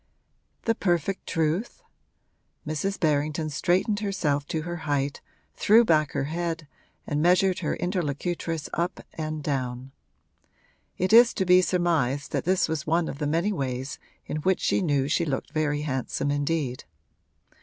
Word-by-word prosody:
'The 230 - +2
perfect 190 -2 -1
truth?' 165 +6 -1 0.8
Mrs. 155 +6 -2
Berrington 155 0 0
straightened 185 +7 +1
herself 150 -9 -1
to 160 -1 -2
her 175 +1 -4
height, 145 -3 -2 0.3
threw 225 +3 +5
back 155 -6 +2
her - - 0
head 165 +1 -3 0.4
and 145 +1 -1
measured 180 +2 +3
her 155 -4 -1
interlocutress 170 -2 -2
up 170 +1 -2
and 155 -1 -4
down; 130 -2 -3 1.1
it 185 +4 0
is 235 +1 +8
to 190 - 0
be 180 0 +6
surmised 160 -7 0
that - - -1
this 185 +1 +2
was 160 -2 -3
one 165 +1 +2
of 140 - -6
the 150 - -1
many 170 +7 +1
ways 130 -4 -3 0.3
in - - -3
which 185 +4 +1
she - - +2
knew 145 -6 +1
she 160 +3 +1
looked 140 -5 -3
very 150 -1 0
handsome 140 0 -2
indeed. 145 -3 -1
160 Hz, 145 wpm, -26 LUFS, 145-180 Hz, 1.1 s, is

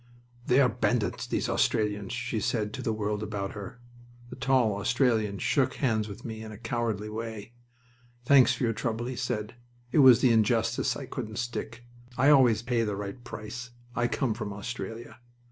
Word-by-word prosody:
"They 125 +2 +4
are 135 - +6
bandits, 120 -2 -1
these - - -1
Australians!" 105 0 0
she 120 -1 -2
said 105 -1 -1
to - - -5
the 115 - -1
world 105 -1 -2
about 100 -2 -3
her. 105 +3 -8 0.5
The - - -6
tall 130 -5 +2
Australian 110 -2 +1
shook 135 +6 +1
hands 110 -5 0
with 100 -1 -9
me 110 -2 -6
in 110 0 -8
a 105 - -9
comradely 115 -2 -2
way. 110 0 -6 0.7
"Thanks 130 -1 +6
for 125 - -4
your 115 -1 +2
trouble," 115 +1 -2
he 130 +1 -4
said. 120 -3 -3 0.4
"It 155 - +3
was 130 -4 +8
the 125 - +5
injustice 110 0 +2
I - - -6
couldn't 110 0 -6
stick. 120 0 -5 0.3
I 135 +3 +5
always 120 -6 +5
pay 120 -1 +1
the 105 -3 -1
right 100 +4 -6
price. 120 +1 -7 0.3
I 120 0 +2
come 120 -1 0
from 110 -2 -5
Australia." 115 +3 -7
115 Hz, 180 wpm, -28 LUFS, 105-125 Hz, 0.7 s, was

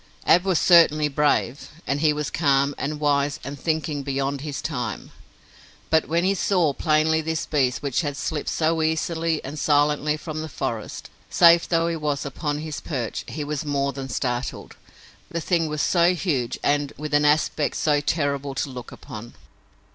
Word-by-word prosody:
Ab 180 +2 +5
was 190 -3 +2
certainly 155 -4 +5
brave, 145 -2 0 0.2
and 140 +1 -1
he 155 -1 +4
was 150 -1 -3
calm 140 -2 +2
and 150 +1 -3
wise 145 -1 +1
and 140 +1 -7
thinking 155 -1 -1
beyond 140 0 -2
his 145 -1 -5
time, 125 -7 -4 0.8
but 160 - +3
when 170 +2 +1
he 190 +2 +3
saw 180 -6 +1
plainly 155 +1 +2
this 160 0 -2
beast 130 -3 0
which 140 0 0
had 145 -3 -3
slipped 150 0 -3
so 160 0 +1
easily 160 0 -1
and 145 +3 -6
silently 150 0 +2
from 155 0 -6
the 160 - -6
forest, 115 -5 -5 0.2
safe 170 0 +5
though 165 -1 +2
he 170 - -1
was 150 -3 -2
upon 145 +2 -3
his 155 0 -5
perch, 125 -7 -4
he 155 - -5
was 145 -1 -3
more 140 -2 -1
than 135 0 -6
startled. 125 0 -3 0.5
The 170 - -3
thing 165 -1 0
was 150 -1 -2
so 175 0 +3
huge 145 -9 -1
and 145 0 +1
with 150 0 -6
an 145 0 +4
aspect 150 0 +2
so 150 -2 +2
terrible 140 -2 -1
to 140 - -2
look 125 -2 -8
upon! 115 +2 -10
150 Hz, 175 wpm, -24 LUFS, 140-160 Hz, 0.8 s, Ab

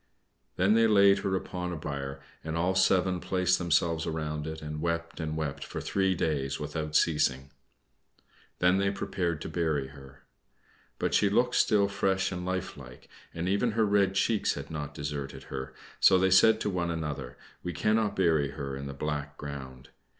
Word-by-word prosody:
Then 95 +4 +3
they 115 0 +5
laid 100 -2 +5
her 95 -1 -1
upon 90 -1 -4
a - - -3
bier, 70 -2 -5 0.2
and 80 +1 -3
all 90 +3 +1
seven 95 -1 +3
placed 90 0 +1
themselves 85 -1 +1
around 75 -1 -3
it, 80 0 -5
and 75 0 -6
wept 85 0 -2
and 80 -1 -3
wept 75 -3 -3
for - - -6
three 95 -1 0
days 70 -5 -1
without 75 0 -4
ceasing. 70 -4 +2 1.1
Then 90 +2 +3
they 100 0 +2
prepared 85 -5 -2
to - - -5
bury 80 -5 -1
her. 70 -1 -14 0.7
But - - -1
she 100 - +4
looked 125 +4 +2
still 100 -2 +3
fresh 95 -1 0
and 90 -1 -4
life 95 -2 -3
like, 65 -3 -13 0.2
and 85 +2 -4
even 100 +4 +1
her 110 0 +2
red 100 -2 +2
cheeks 110 +2 +1
had - - -7
not 75 -2 -5
deserted 70 -2 -5
her, 65 -1 -5 0.3
so 95 - +6
they 95 +1 +2
said 110 +4 +6
to - - 0
one 90 -2 -1
another, 75 -6 -4 0.2
"We 90 - -4
cannot 110 +6 +1
bury 80 -6 +2
her 70 -1 -5
in 70 +1 -6
the 70 - -7
black 75 0 -4
ground." 65 -3 -8
85 Hz, 180 wpm, -29 LUFS, 75-95 Hz, 1.1 s, so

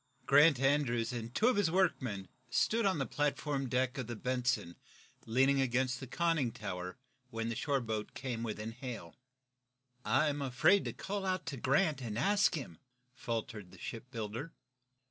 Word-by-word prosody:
Grant 145 0 +6
Andrews 135 -4 +2
and 115 -1 -4
two 215 - +2
of 250 - +3
his 200 -5 +3
workmen 130 - 0 0.2
stood 220 - +2
on 190 - +1
the 135 - 0
platform 145 -2 -1
deck 130 +1 0
of 125 - -3
the 120 - -4
"Benson," 125 -7 -1 0.5
leaning 135 +4 +3
against 130 0 +1
the 130 - -7
conning 160 -3 +1
tower, 90 -3 -5 0.3
when 115 0 -3
the 115 - -2
shore 140 +1 0
boat 110 -2 -4
came 125 -3 -3
within 110 -1 -4
hail. 115 -8 -7 0.9
"I 135 +8 +3
am 145 0 -2
afraid 155 +9 +3
to - - -3
call 200 0 -4
out 185 -1 -1
to 140 - -4
Grant, 140 +3 +2
and 110 -3 -4
ask 200 - +3
him," 125 - -6 0.3
faltered 115 -5 -4
the - - -15
shipbuilder. 115 +4 -6
130 Hz, 165 wpm, -33 LUFS, 115-145 Hz, 0.9 s, Grant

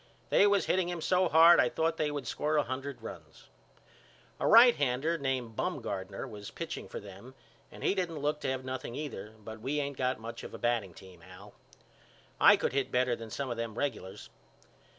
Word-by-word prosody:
They 205 - +6
was 200 -1 +2
hitting 180 -1 +1
him 175 -1 -4
so 180 +2 +2
hard 165 +2 +7
I - - +4
thought 165 0 -1
they 155 -1 0
would 145 -2 -4
score 155 +1 -1
a 145 - +3
hundred 135 +2 -6
runs. - - -11 0.9
A - - 0
righthander 165 - +5
name 130 -4 -2
Bumgardner 100 +2 -4
was 105 -4 -9
pitching - - -6
for - - -7
them 100 +6 -12 0.4
and - - -11
he - - +2
didn't 180 -5 -2
look 150 +1 -1
to - - -2
have 130 0 -3
nothing 130 -2 -5
either 110 -8 -6
but 110 0 -10
we 140 +5 -1
ain't 140 -1 -3
got 130 -2 -1
much 115 +1 -7
of - - -8
a - - -6
batting 115 -7 -1
team 95 -3 -14
Al. 95 +4 -14 0.9
I - - +7
could - - -1
hit 135 -1 -1
better 125 -1 +2
than 115 -1 -9
some 135 +3 -4
of 120 - -4
them 115 -2 -4
regulars. 105 -8 -4
130 Hz, 195 wpm, -30 LUFS, 110-150 Hz, 0.9 s, hard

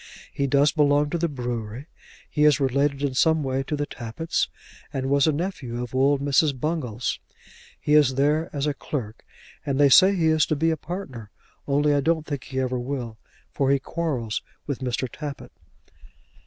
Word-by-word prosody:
He 140 - 0
does 140 +1 +4
belong 145 -1 +2
to 170 - -1
the 170 - +1
brewery. 120 -3 -5 0.4
He 150 - 0
is 150 -1 +5
related 140 +1 +1
in 140 -2 0
some 160 +3 +3
way 135 0 -1
to 145 +3 -3
the 145 0 -2
Tappitts, 130 +6 -3 0.4
and 135 0 -2
was 140 +1 +4
a - - +4
nephew 145 -7 -4
of 125 - -8
old 135 +2 +3
Mrs. 140 0 +2
Bungall's. 125 -7 -2 0.6
He 150 - 0
is 145 -4 +5
there 150 +4 +1
as 140 -1 -2
a 150 - 0
clerk, 125 -6 -5 0.4
and 140 -1 -1
they 145 -1 +6
say 190 +8 +7
he 170 -3 +1
is 155 -2 +3
to 155 - +1
be 165 +3 +2
a - - +1
partner, 145 - -7 0.4
only 145 +1 +2
I 145 - +2
don't 160 +1 +1
think 145 -4 -5
he 130 -1 -4
ever 130 -1 -1
will, 120 -4 -5 0.3
for 135 -1 0
he 140 - +4
quarrels 135 -7 -3 0.2
with 140 -3 -3
Mr. 130 0 -2
Tappitt." 140 -2 -8
140 Hz, 185 wpm, -24 LUFS, 130-150 Hz, 0.6 s, say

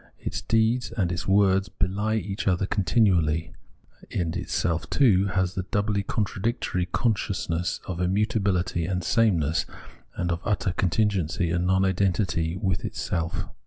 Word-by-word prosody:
Its - - -4
deeds 115 +2 +1
and 90 -5 +1
its 90 - -3
words 95 -1 +3
behe 100 +5 -1
each 100 +1 -4
other 95 0 +2
continually; 90 -6 +1 0.6
and 85 -3 -2
itself, 85 -2 -1
too, 100 -8 +4
has 95 -2 0
the 95 - -2
doubly 105 -2 0
contradictory 100 -2 -2
consciousness 90 -4 -1
of 90 -2 -5
immutabihty 95 -2 0
and 90 -2 -1
sameness, 85 -7 +2 0.5
and 90 0 -1
of 85 +1 -2
utter 100 -2 0
contingency 90 -3 0
and 90 +1 0
non 95 +1 +3
identity 90 -3 0
with 95 -3 -1
itself. 85 -1 -2
95 Hz, 130 wpm, -26 LUFS, 85-100 Hz, 0.6 s, too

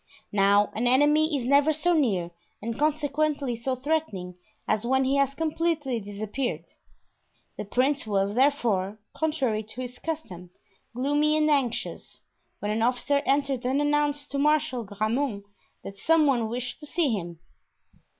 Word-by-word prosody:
Now 200 0 +3
an 235 +3 0
enemy 295 +4 +4
is 250 - -4
never 280 +4 +4
so 310 +3 +1
near 200 - +1 0.3
and 230 +3 -5
consequently 295 -3 0
so 255 +3 -2
threatening, 255 - -2 0.3
as 215 0 +1
when 265 +2 +2
he 270 +2 +1
has 275 0 +1
completely 315 -5 -1
disappeared. 210 +5 -4 0.9
The - - -5
prince 260 +4 0
was, 200 -1 0
therefore, 225 -7 +1 0.2
contrary 275 -9 0
to 220 +4 -9
his 250 0 -7
custom, 190 - -6 0.5
gloomy 290 +4 +2
and 305 0 +3
anxious, 265 -5 -2 0.4
when 205 - -3
an 220 +1 -1
officer 250 +4 +1
entered 275 -2 +1
and 260 +3 +1
announced 290 0 0
to 280 - -1
Marshal 300 -4 +1
de 205 - -12
Grammont 215 +1 -1 0.4
that 195 0 -9
some 325 -1 +4
one 240 -6 +1
wished 245 +1 -4
to 300 - -8
see 310 -3 +1
him. 175 -4 -4
265 Hz, 150 wpm, -26 LUFS, 220-295 Hz, 0.9 s, enemy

